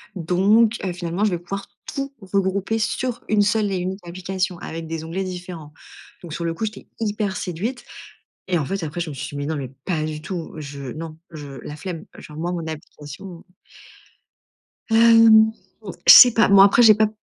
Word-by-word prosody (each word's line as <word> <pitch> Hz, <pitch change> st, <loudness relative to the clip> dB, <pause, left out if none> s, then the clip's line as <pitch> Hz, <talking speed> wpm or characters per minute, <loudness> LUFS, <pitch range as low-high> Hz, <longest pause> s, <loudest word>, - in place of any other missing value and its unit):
donc, 200 Hz, +7 st, +3 dB
heu, 185 Hz, -2 st, -3 dB
finalement 175 Hz, +3 st, -2 dB
je 205 Hz, -, +1 dB
vais 175 Hz, -, -1 dB
pouvoir 195 Hz, +3 st, -6 dB, 0.3 s
tout 275 Hz, 0 st, -4 dB
regrouper 195 Hz, +3 st, -1 dB
sur 245 Hz, +2 st, -2 dB
une 210 Hz, -1 st, +3 dB
seule 210 Hz, 0 st, +1 dB
et 190 Hz, -, -2 dB
unique 190 Hz, +2 st, -4 dB
application, 185 Hz, +1 st, -3 dB
avec 165 Hz, 0 st, -7 dB
des 160 Hz, -1 st, -5 dB
onglets 185 Hz, +4 st, -4 dB
différents». 175 Hz, -4 st, -8 dB, 0.5 s
Donc 170 Hz, -, -9 dB
sur 170 Hz, +2 st, -4 dB
le 165 Hz, -, -1 dB
coup 195 Hz, -, -6 dB
j'étais 215 Hz, 0 st, -5 dB
hyper 205 Hz, -2 st, -2 dB
séduite 205 Hz, +8 st, -4 dB, 0.7 s
et 175 Hz, -, +2 dB
en 150 Hz, -, -2 dB
fait 195 Hz, +1 st, -3 dB
après 155 Hz, +3 st, -5 dB
je 165 Hz, -2 st, -3 dB
me 140 Hz, -, -7 dB
suis -, -, -6 dB
dit: 145 Hz, -, -8 dB
«Mais 145 Hz, -, -3 dB
non 155 Hz, +1 st, -2 dB
mais 135 Hz, -3 st, -5 dB, 0.2 s
pas 160 Hz, -5 st, -1 dB
du 155 Hz, -1 st, -5 dB
tout, 175 Hz, -1 st, -6 dB
je 140 Hz, -3 st, -7 dB
non 160 Hz, 0 st, -8 dB
je 150 Hz, -3 st, -9 dB, 0.2 s
la 150 Hz, -, -8 dB
flemme, 175 Hz, -3 st, -6 dB
genre 150 Hz, -, -12 dB
moi 170 Hz, +3 st, -3 dB
mon 170 Hz, -2 st, -4 dB
application» 160 Hz, +3 st, -9 dB, 1.4 s
Hem, 225 Hz, -1 st, +6 dB, 0.6 s
je -, -, +12 dB
sais 245 Hz, -, +10 dB
pas. 225 Hz, -, +4 dB
Bon 200 Hz, -1 st, +6 dB
après, 200 Hz, +4 st, +6 dB
j'ai 215 Hz, -3 st, +8 dB
pas 215 Hz, 0 st, +3 dB
180 Hz, 195 wpm, -22 LUFS, 160-210 Hz, 1.4 s, je